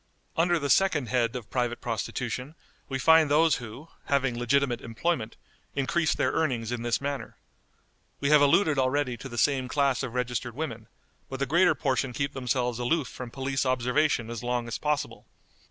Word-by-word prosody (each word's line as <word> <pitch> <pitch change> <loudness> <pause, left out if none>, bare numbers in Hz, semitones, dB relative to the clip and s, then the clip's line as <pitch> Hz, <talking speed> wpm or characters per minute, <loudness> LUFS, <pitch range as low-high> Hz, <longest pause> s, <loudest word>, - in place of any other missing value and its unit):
Under 175 +1 +3
the 145 -3 -2
second 155 - +3
head 120 0 +1
of 120 -4 -7
private 120 -2 -1
prostitution 125 +4 -4 0.3
we 135 - -1
find 160 +2 +5
those 155 +2 +4
who, 125 +6 -10 0.2
having 135 -3 +1
legitimate 120 +1 +1
employment, 115 0 -2 0.4
increase 150 +4 +1
their - - +1
earnings 125 -8 -1
in 120 -1 -3
this 120 0 0
manner. 140 0 -5 0.8
We 140 +1 0
have 150 -1 +7
alluded 145 0 +4
already 130 -1 +1
to 135 - -8
the 120 - -8
same 130 0 +2
class 140 -1 +1
of 125 -3 -5
registered 125 -1 -2
women, 115 -7 -5 0.4
but 135 - -5
the 140 - +1
greater 170 +3 +4
portion 130 -2 -1
keep 140 +4 -2
themselves 125 -2 -1
aloof 125 +2 0
from 125 -2 -8
police 135 +1 -2
observation 130 -1 +1
as 115 -2 -5
long 120 -1 -2
as 115 - -4
possible. 150 -2 -2
130 Hz, 170 wpm, -27 LUFS, 120-145 Hz, 0.8 s, have